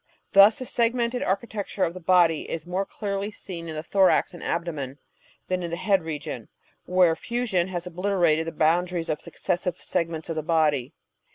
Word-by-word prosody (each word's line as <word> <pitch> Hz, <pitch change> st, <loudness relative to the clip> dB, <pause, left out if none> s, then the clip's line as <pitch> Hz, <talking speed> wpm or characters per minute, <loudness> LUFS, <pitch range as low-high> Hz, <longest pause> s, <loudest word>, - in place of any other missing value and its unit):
Thus 200 Hz, +2 st, +7 dB
the 255 Hz, -, -5 dB
segmented 235 Hz, +1 st, 0 dB
architecture 200 Hz, 0 st, -2 dB
of 165 Hz, -, 0 dB
the 185 Hz, -, -8 dB
body 170 Hz, -2 st, +3 dB
is 165 Hz, -1 st, -4 dB
more 185 Hz, +2 st, -2 dB
clearly 200 Hz, -1 st, -3 dB
seen 170 Hz, -5 st, -8 dB
in 160 Hz, -, -5 dB
the 155 Hz, -, -4 dB
thorax 190 Hz, +1 st, +3 dB
and 175 Hz, -, -10 dB
abdomen 150 Hz, -6 st, -3 dB, 0.5 s
than 185 Hz, 0 st, -1 dB
in 170 Hz, -, -3 dB
the 170 Hz, -, -2 dB
head 190 Hz, +1 st, +2 dB
region, 150 Hz, -7 st, -5 dB, 0.4 s
where 180 Hz, -2 st, +4 dB
fusion 225 Hz, -5 st, -1 dB
has 175 Hz, -2 st, -4 dB
obliterated 175 Hz, -3 st, +1 dB
the -, -, -2 dB
boundaries 170 Hz, +2 st, +1 dB
of 150 Hz, -, -1 dB
the -, -, -15 dB
successive 180 Hz, -1 st, -2 dB
segments 165 Hz, -3 st, -2 dB
of 165 Hz, -, -3 dB
the -, -, 0 dB
body. 150 Hz, -5 st, +1 dB
175 Hz, 180 wpm, -25 LUFS, 165-195 Hz, 0.5 s, Thus